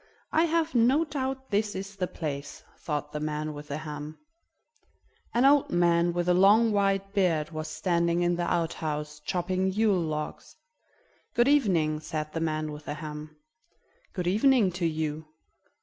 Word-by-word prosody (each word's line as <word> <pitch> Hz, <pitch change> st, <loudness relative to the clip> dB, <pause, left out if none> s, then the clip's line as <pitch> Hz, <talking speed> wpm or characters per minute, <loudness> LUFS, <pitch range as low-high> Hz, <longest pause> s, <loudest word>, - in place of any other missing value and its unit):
"I 320 Hz, +2 st, +3 dB
have 330 Hz, -1 st, 0 dB
no 255 Hz, +7 st, +4 dB
doubt 265 Hz, -3 st, -4 dB
this 205 Hz, +1 st, 0 dB
is 195 Hz, +1 st, -6 dB
the 185 Hz, -2 st, -2 dB
place," 145 Hz, -4 st, -6 dB, 0.2 s
thought 150 Hz, -2 st, -3 dB
the 150 Hz, -, -4 dB
man 150 Hz, 0 st, -3 dB
with 145 Hz, 0 st, -9 dB
the 145 Hz, -, -3 dB
ham. 150 Hz, 0 st, -7 dB, 1.1 s
An 240 Hz, +3 st, +2 dB
old 280 Hz, 0 st, +5 dB
man 175 Hz, 0 st, +3 dB
with 175 Hz, 0 st, -2 dB
a 180 Hz, -, +4 dB
long 205 Hz, +5 st, +5 dB
white 195 Hz, -1 st, +1 dB
beard 170 Hz, -6 st, +1 dB
was 155 Hz, 0 st, -5 dB
standing 170 Hz, 0 st, 0 dB
in 175 Hz, 0 st, +2 dB
the 175 Hz, 0 st, -2 dB
outhouse, 150 Hz, -3 st, -2 dB
chopping 185 Hz, +4 st, -1 dB
Yule 205 Hz, -2 st, +2 dB
logs. 155 Hz, -2 st, -5 dB, 0.8 s
"Good 240 Hz, +1 st, +4 dB
evening," 180 Hz, -, +2 dB
said 155 Hz, 0 st, -5 dB
the 165 Hz, -, -2 dB
man 155 Hz, -1 st, -1 dB
with 150 Hz, +1 st, -9 dB
the 145 Hz, -, -4 dB
ham. 150 Hz, 0 st, -8 dB, 0.8 s
"Good 180 Hz, -, -4 dB
evening 215 Hz, +2 st, +4 dB
to 175 Hz, -1 st, -1 dB
you. 155 Hz, -1 st, -3 dB
175 Hz, 160 wpm, -28 LUFS, 155-200 Hz, 1.1 s, old